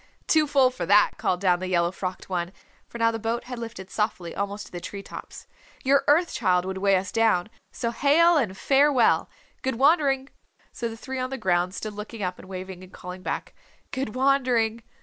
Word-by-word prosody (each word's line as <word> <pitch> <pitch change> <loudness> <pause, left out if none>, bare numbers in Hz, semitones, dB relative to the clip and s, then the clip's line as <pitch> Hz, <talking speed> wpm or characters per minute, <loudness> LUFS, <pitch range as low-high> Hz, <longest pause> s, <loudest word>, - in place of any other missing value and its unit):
"Too 310 -1 +3
full 270 -3 +4
for 255 - -5
that," 205 +1 +4
called 180 0 0
down 180 -2 +3
the 185 - -4
yellow 175 -1 +2
frocked 185 0 -5
one, 180 -1 -3 0.3
for - - -9
now 230 0 +3
the 225 - -4
boat 230 +2 -2
had 250 -1 -7
lifted 225 -5 -8
softly 200 -6 -2
almost 200 +1 -3
to - - -15
the 175 - -6
tree 200 +2 -7
tops. - - -10 0.4
"Your 275 0 +4
Earth 330 +4 +4
Child 180 0 +2
would 190 0 -4
weigh 195 0 +3
us 185 0 -1
down. 220 -4 +2 0.2
So 235 -2 -2
hail 320 +7 +4
and 215 -11 0
farewell. 275 -2 +3 0.3
Good 265 -1 -1
wandering!" 275 0 +3 0.4
So 235 - -4
the 225 - -8
three 260 +2 -5
on 255 0 -2
the 270 - -4
ground 180 -2 +1
stood 215 -1 -5
looking 210 +1 -7
up 180 0 -3
and 185 - -13
waving 185 -1 -7
and 185 - -14
calling 180 +1 -9
back, - - -4 0.4
"Good 260 -4 -3
wandering!" 250 -4 +2
225 Hz, 205 wpm, -25 LUFS, 185-265 Hz, 0.4 s, full